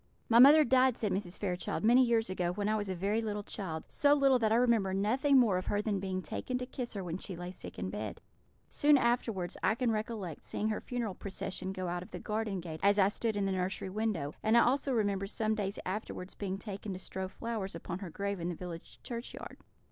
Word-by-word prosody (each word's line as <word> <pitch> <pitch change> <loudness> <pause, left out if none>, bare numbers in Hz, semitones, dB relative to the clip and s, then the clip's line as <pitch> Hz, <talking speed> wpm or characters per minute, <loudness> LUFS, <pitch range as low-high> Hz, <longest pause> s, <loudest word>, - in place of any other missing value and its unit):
"My 235 0 +6
mother 295 +5 +9
died," 255 -1 +4
said 210 -3 -1
Mrs. 185 -1 -3
Fairchild, 180 -2 -2
"many 245 +4 +6
years 230 -2 +2
ago, 180 -2 -1
when 205 +2 -2
I 215 - +2
was 205 -2 -2
a 185 - -2
very 200 +5 0
little 210 -2 -3
child 165 -7 -5
so 290 0 +3
little 275 -3 +4
that 220 -2 +2
I - - +5
remember 230 -6 +3
nothing 255 +8 +3
more 215 -8 +4
of 185 - -8
her 205 - +1
than 210 -2 0
being 185 -1 -3
taken 250 +7 -3
to 250 - -4
kiss 250 -2 -6
her 195 - -3
when 175 0 -4
she 190 - -6
lay 175 +1 -6
sick 185 - -9
in 95 +1 -3
bed. 105 0 -5 0.5
Soon 290 0 +4
afterwards 230 -7 0
I 220 - +2
can 240 -1 +1
recollect 215 -6 -4
seeing 215 - -2
her 215 - -2
funeral 235 -5 -3
procession 190 0 -4
go 185 -1 -4
out 175 0 -2
of 180 - -10
the - - -6
garden 210 -3 -2
gate 160 -2 -7
as 200 +1 +4
I 195 -1 +5
stood 220 0 -2
in 200 - +1
the 195 - 0
nursery 185 0 -2
window; 195 -9 -1
and 220 +2 +4
I - - +8
also 270 +3 +2
remember 200 -4 0
some 220 +1 0
days 200 -2 -2
afterwards 185 -1 -4
being 195 -2 -3
taken 200 -1 -6
to - - -5
strew 190 0 -4
flowers 205 -2 -4
upon 170 +1 -5
her 195 -3 -6
grave 200 +3 -3
in 170 +1 -2
the 175 - -3
village 170 -1 -9
churchyard. 235 0 -7
205 Hz, 235 wpm, -32 LUFS, 185-230 Hz, 0.5 s, mother